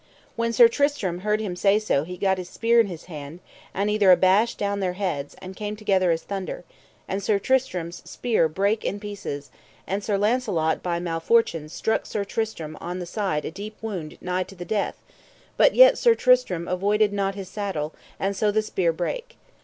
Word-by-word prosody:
When 230 0 0
Sir 235 +1 +8
Tristram 230 -9 0
heard 210 +2 0
him 200 -5 -3
say 195 +3 +3
so 215 -10 +1
he 180 +1 -7
gat 190 0 +1
his 180 -1 -7
spear 235 +3 +2
in 225 - +4
his 175 -4 -8
hand, 155 -1 -8 0.3
and 200 +2 -1
either 210 -2 +3
abashed 190 +5 +4
down 200 -1 -1
their 185 -2 -1
heads, 175 -7 -3
and 185 0 -10
came 210 +1 -4
together 195 -4 +1
as 165 -1 0
thunder; 195 -3 -5 0.4
and 195 +1 -2
Sir 205 +1 +2
Tristram's 190 -8 -1
spear 225 -9 +1
brake 200 +7 0
in 205 - -2
pieces, 200 -9 -6 0.3
and 195 +2 -2
Sir 205 -1 0
Launcelot 200 -8 +1
by 170 -1 -1
malfortune 165 -1 +1
struck 220 +7 -1
Sir 205 - -2
Tristram 195 -8 -4
on 175 +1 -4
the 180 - -5
side 175 -5 -2
a - - -4
deep 205 +4 -8
wound 190 -9 -5
nigh 180 0 -1
to 185 +2 -7
the 175 -1 -7
death; 210 0 -2 0.5
but - - +4
yet - - +8
Sir 470 -2 +5
Tristram 250 - +2
avoided 205 +3 +1
not 195 -1 -1
his 195 -2 -6
saddle, 185 -7 -3 0.3
and 195 +1 -1
so 210 +2 +1
the 215 +1 +1
spear 185 -5 0
brake. 325 - -4
195 Hz, 195 wpm, -24 LUFS, 175-215 Hz, 0.5 s, Sir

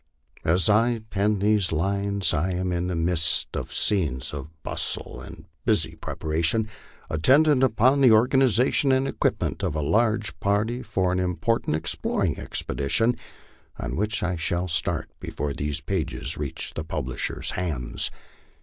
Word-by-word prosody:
As 85 +1 +2
I 115 +2 +3
pen 105 +1 +1
these 105 -1 +2
lines, 100 +2 0
I 85 +5 0
am 90 0 -1
in 90 0 -1
the 90 - -2
midst 85 -1 0
of - - -4
scenes 75 -12 +1
of 75 0 -6
bustle - - -3
and - - -11 0.2
busy - - +1
prepa - - -8
ration 80 +7 +1 0.4
attendant 135 - +4
upon 130 +2 +3
the 130 -3 +7
organization 125 +3 +3
and 130 +1 +2
equipment - - -1
of 90 -5 -1
a 75 - -1
large 105 -2 +1
party 105 +6 0
for 95 -5 0
an 90 - 0
important 90 +1 0
exploring 80 +2 0
expedition, 115 - +1 0.6
on - - -4
which 105 +4 -1
I 90 0 -1
shall 85 +2 0
start 80 - 0
before 75 -1 -4
these 75 +3 -3
pages 85 -2 -2
reach - - -5
the 80 - -4
publishers' 65 -5 -2
hands. 75 -9 -3
95 Hz, 145 wpm, -25 LUFS, 80-110 Hz, 0.6 s, the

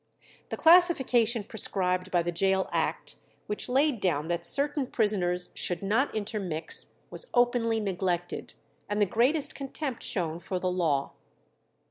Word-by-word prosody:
The - - -4
classification 265 - +4
prescribed 185 -3 -1
by 175 -2 +1
the 175 - -2
Gaol 190 +2 +1
Act, - - -2 0.3
which 210 +4 -3
laid 270 -1 +2
down 160 -5 -1
that 170 0 -2
certain 280 - +3
prisoners 185 -7 0
should 180 +2 -1
not 225 +8 0
intermix, 200 -7 0 0.2
was - - -9
openly 240 -2 +2
neglected, 180 -3 -3 0.3
and 205 0 -1
"the 205 - +4
greatest 255 - +1
contempt 275 -1 -5
shown 170 -5 -2
for 185 +1 -4
the 180 0 -2
law." 155 -6 0
205 Hz, 135 wpm, -28 LUFS, 180-245 Hz, 0.3 s, classification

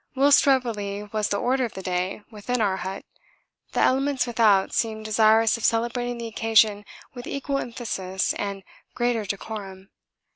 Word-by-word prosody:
Whilst 280 +2 +5
revelry 210 -7 0
was 215 -1 0
the 200 - 0
order 255 +4 +1
of 235 - -4
the 190 - -7
day 185 +2 -2
within 230 +4 -3
our 200 -3 +1
hut, 190 +1 -6 0.7
the - - +1
elements 270 0 +2
without 220 -5 +3
seemed 220 -1 -1
desirous 220 +1 +4
of 230 - -10
celebrating 240 +1 0
the 235 - -6
occasion 220 -2 +2 0.3
with 245 0 -9
equal 275 0 -2
emphasis 195 -7 -3
and 200 -1 -4 0.3
greater 240 -3 0
decorum. 195 -1 -7
220 Hz, 150 wpm, -24 LUFS, 200-245 Hz, 0.7 s, Whilst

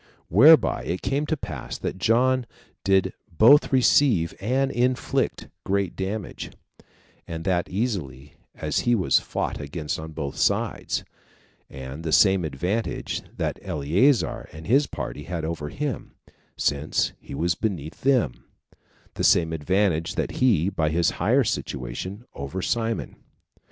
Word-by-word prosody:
Whereby 145 - +6
it 90 +2 -3
came 145 +2 -1
to 155 - 0
pass 75 - -6
that 95 - -4
John 125 +4 +2 0.4
did 95 -1 +2 0.2
both 120 - +6
receive 125 - +4
and 135 +6 +1
inflict 125 0 0 0.2
great 100 -2 -1
damage, 100 +1 -4 0.8
and 80 -1 -5
that 90 -2 0
easily, 85 - -3 0.2
as - - -1
he 120 - +2
was 95 -6 +3
fought - - -3
against 75 +2 -4
on 80 0 -7
both 70 -3 -5
sides; - - 0 0.7
and 65 +4 -8
the 80 - -2
same 95 +2 +5
advantage 90 +10 -2 0.2
that - - -2
Eleazar 90 - +1
and 80 +1 -10
his 140 +6 +3
party 70 +2 -6
had 85 -1 -4
over 80 -2 -4
him, 145 - -4 0.4
since 70 +2 0
he - - -9
was 85 +4 +1
beneath 85 -6 -4
them, 125 - +1 0.7
the - - -4
same 80 -1 +4
advantage 85 +1 0
had - - -1
he, 105 -10 +2
by 80 -5 0
his 85 +1 +2
higher - - +4
situation, 95 - -4
over 70 +6 -5
Simon. 115 +3 -2
90 Hz, 135 wpm, -24 LUFS, 80-115 Hz, 0.8 s, Whereby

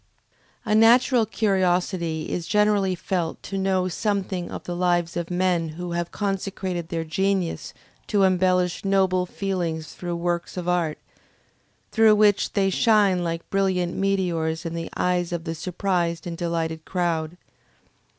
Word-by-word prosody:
A 210 - 0
natural 230 +1 +5
curiosity 180 -6 0
is 170 -2 -3
generally 210 -2 +2
felt 175 -2 -3
to 195 - -6
know 190 -1 +1
something 190 -1 -2
of - - -7
the 175 - -4
lives 175 -1 +1
of 170 -1 -3
men 180 -2 +1
who 175 0 -5
have 170 0 -2
consecrated 190 -3 -3
their 165 -1 -2
genius 190 +2 -1 0.4
to 205 -2 +2
embellish 185 -1 +2
noble 190 -2 +2
feelings 175 -5 -3
through 175 -1 -4
works 175 +1 -2
of 180 -1 -4
art, 175 -3 0 0.9
through 220 -1 +5
which 205 -1 +3
they 195 -1 +2
shine 205 -4 +3
like 165 -1 -3
brilliant 190 -3 +1
meteors 175 -4 0
in 165 - -3
the 165 0 -4
eyes 180 -1 0
of 170 -2 -3
the 165 - -3
surprised 175 -1 -2
and 170 -1 -4
delighted 165 -2 -2
crowd. 170 -2 -2
180 Hz, 140 wpm, -24 LUFS, 170-195 Hz, 0.9 s, natural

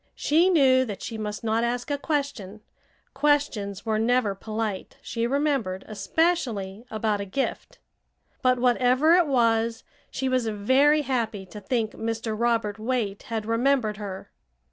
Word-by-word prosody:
She 330 +5 +3
knew 265 -7 +5
that 205 -5 -7
she 230 - -5
must 210 0 -4
not 225 +1 +1
ask 245 +3 -2
a 285 - +1
question; 280 - -3 0.5
questions 270 -9 0
were 220 -1 0
never 230 -2 +2
polite, 215 0 -4
she 230 0 -2
remembered, 270 -9 -1
especially 215 - -1
about 215 -1 -1
a - - -4
gift. 260 +8 -3 0.6
But 255 0 +3
whatever 250 +5 +3
it 350 -2 +4
was 230 -3 +1 0.3
she 265 - -3
was 255 -3 +1
very 265 +8 +3
happy 225 -7 -2
to 210 +3 -10
think 225 0 -1
Mr. 225 0 -3
Robert 225 -2 0
Waite 220 -4 -2
had 220 -2 -2
remembered 230 -1 +1
her. 200 -3 -7
230 Hz, 145 wpm, -25 LUFS, 210-265 Hz, 0.6 s, knew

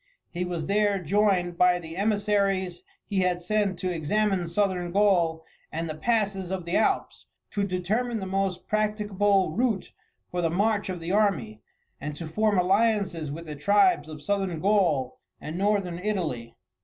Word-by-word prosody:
He 180 0 -2
was 170 -3 -3
there 205 +1 +2
joined 185 -1 +1
by 180 0 +5
the 165 -2 -8
emissaries 200 -2 0 0.2
he 200 -2 -1
had 180 -1 +1
sent 195 +1 0
to 185 0 -2
examine 190 +2 0
Southern 180 -1 0
Gaul 175 -5 +2 0.3
and 165 +1 -3
the 155 - -3
passes 195 +1 0
of 185 -2 -3
the 170 - -2
Alps, 220 - 0 0.2
to 205 - -1
determine 210 +6 -1
the 190 - -4
most 190 -1 -1
practicable 205 -3 +1
route 220 0 -1 0.4
for 180 - -1
the 165 - +1
march 205 +4 +1
of 180 -2 -4
the 165 +2 -3
army, 160 - +1 0.4
and 145 +1 -5
to 165 +1 -6
form 210 +5 +1
alliances 190 -4 +1
with 165 +3 -7
the 150 -2 -6
tribes 200 - +3
of 150 -1 -9
Southern 195 -4 -1
Gaul 175 -10 +1 0.2
and 155 - -6
Northern 195 -2 0
Italy. 165 - -3
190 Hz, 160 wpm, -26 LUFS, 170-205 Hz, 0.4 s, by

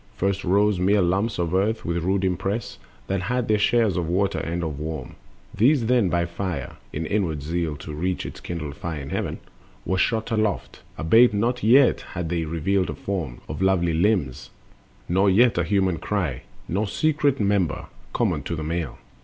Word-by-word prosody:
First 100 0 0
rose 100 +1 +2
mere 100 +3 +3
lumps 100 +5 +1
of 85 -1 -1
earth 105 +4 +1
with 85 0 -1
rude 95 +2 +1
impress, 95 +4 -2 0.3
That 95 -1 -1
had 125 +5 -1
their 105 -1 +2
shares 110 -3 +2
of 85 -2 -1
Water 95 +3 +1
and 85 +1 -3
of 75 -3 -4
Warm. 80 +1 -5 0.4
These 125 +3 +3
then 120 -5 +3
by 85 0 +1
Fire 85 +1 -4
(in 80 +2 -3
upward 80 -6 -1
zeal 80 0 -2
to 75 - -8
reach 90 +4 -2
Its - - -7
kindred 75 -5 -5
Fire 85 -3 -5
in 70 0 -7
heaven) - - -2 0.5
were 95 0 0
shot 110 +3 0
aloft, 110 -3 -1 0.2
Albeit 110 +8 +5
not 120 +4 0
yet 125 +4 +5
had 85 -2 -3
they 85 -1 -1
revealed 90 +4 0
a - - -4
form 85 -11 -4
Of - - -5
lovely 90 -3 +2
limbs, 85 - 0 0.6
nor 95 +3 +3
yet 110 +1 +4
a - - +2
human 95 -1 +1
cry, 80 -10 -2 0.3
Nor 100 +5 -1
secret 145 +3 +1
member, 100 -4 +1 0.3
common - - 0
to 85 - -4
the 80 - -4
male. 80 -3 -3
95 Hz, 180 wpm, -24 LUFS, 85-105 Hz, 0.6 s, Albeit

